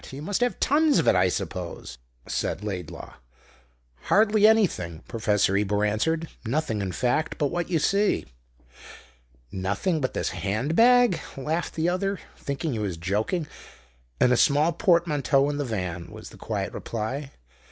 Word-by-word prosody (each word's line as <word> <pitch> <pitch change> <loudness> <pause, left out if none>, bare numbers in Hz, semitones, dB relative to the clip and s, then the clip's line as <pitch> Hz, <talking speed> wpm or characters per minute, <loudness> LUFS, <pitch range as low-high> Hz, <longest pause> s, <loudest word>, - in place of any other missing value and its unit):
You 140 +2 -8
must 205 +7 -2
have 245 0 0
tons 300 +1 +3
of - - +1
it, - - +6
I 90 0 +4
suppose?" 60 - -5 0.3
said 105 - -2
Laidlaw. 90 -6 -6 0.9
"Hardly 215 0 +4
anything," 170 - +1
Professor 105 -4 +1
Ebor 105 +1 +1
answered. 160 +11 0 0.2
"Nothing, 115 -3 -1
in 95 -2 -2
fact, 125 - 0
but 145 -3 0
what 175 0 -2
you 175 - +2
see." 200 +7 +1 1.3
"Nothing 100 - -1
but 130 - -2
this - - -1
hand 105 - -2
bag?" 245 -5 +5 0.2
laughed 155 +6 -2
the 165 +1 0
other, 195 +2 -1 0.2
thinking 140 +3 -4
he 110 - -3
was 100 -5 -3
joking. 105 - -1 0.7
"And 125 - +4
a - - +3
small 150 +5 +4
portmanteau 150 -5 +2
in 145 - -4
the 145 - -2
van," 90 -7 -4
was - - -10
the - - -14
quiet - - -4
reply. 125 +6 -4
140 Hz, 150 wpm, -25 LUFS, 105-175 Hz, 1.3 s, it